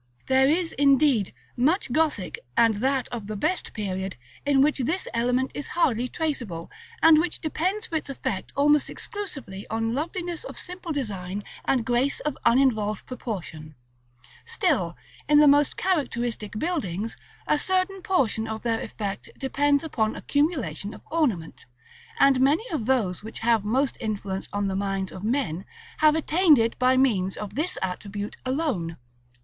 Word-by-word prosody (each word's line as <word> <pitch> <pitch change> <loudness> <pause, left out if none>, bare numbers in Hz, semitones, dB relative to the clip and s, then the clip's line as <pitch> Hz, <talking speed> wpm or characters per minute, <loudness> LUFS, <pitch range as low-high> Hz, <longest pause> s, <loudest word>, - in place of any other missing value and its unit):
There 265 +1 +4
is, 335 +2 +1
indeed, 275 -6 +3 0.2
much 285 +3 +1
Gothic, 285 - 0 0.2
and 225 -3 +4
that 265 +3 +1
of 225 -4 -6
the 215 - -4
best 360 - -1
period, 190 -2 -3 0.3
in 280 -2 +4
which 290 +1 +3
this 315 +9 -1
element 250 +3 +1
is 290 - -5
hardly 250 -7 +2
traceable, 240 - -3 0.3
and 320 -1 +8
which 345 +1 -1
depends 370 +7 -1
for 335 -8 -1
its 300 - -6
effect 200 -8 -3
almost 295 +1 +4
exclusively 280 - -7
on 225 +1 -1
loveliness 340 - -3
of - - -8
simple 360 -2 -6
design 205 - -3 0.2
and 250 -4 +1
grace 250 +4 +1
of 300 -2 -2
uninvolved 230 -5 +3
proportion: 175 - -6 0.7
still, - - 0 0.3
in 295 - +6
the 300 0 +7
most 290 0 +4
characteristic 240 - -1
buildings, 225 - -2 0.3
a 300 - +2
certain 375 +3 0
portion 240 - +1
of 220 0 -5
their 230 -1 0
effect 200 -2 -5
depends 285 +2 +1
upon 220 -9 -1
accumulation 285 - -1
of - - -14
ornament; 240 - -1 0.5
and 270 -2 +5
many 295 - +3
of 270 -10 -2
those 215 -10 +1
which 220 - -8
have 225 -2 +3
most 255 +6 +1
influence 200 -3 -3
on 205 0 -1
the 190 - -2
minds 195 -1 -2
of 185 - -9
men, 210 - -1 0.4
have 310 0 +5
attained 320 0 +4
it 225 0 0
by 255 +1 +4
means 200 -8 +2
of 205 -2 -6
this 315 - 0
attribute 200 +3 -4
alone. 255 - -1
255 Hz, 155 wpm, -26 LUFS, 210-300 Hz, 0.7 s, and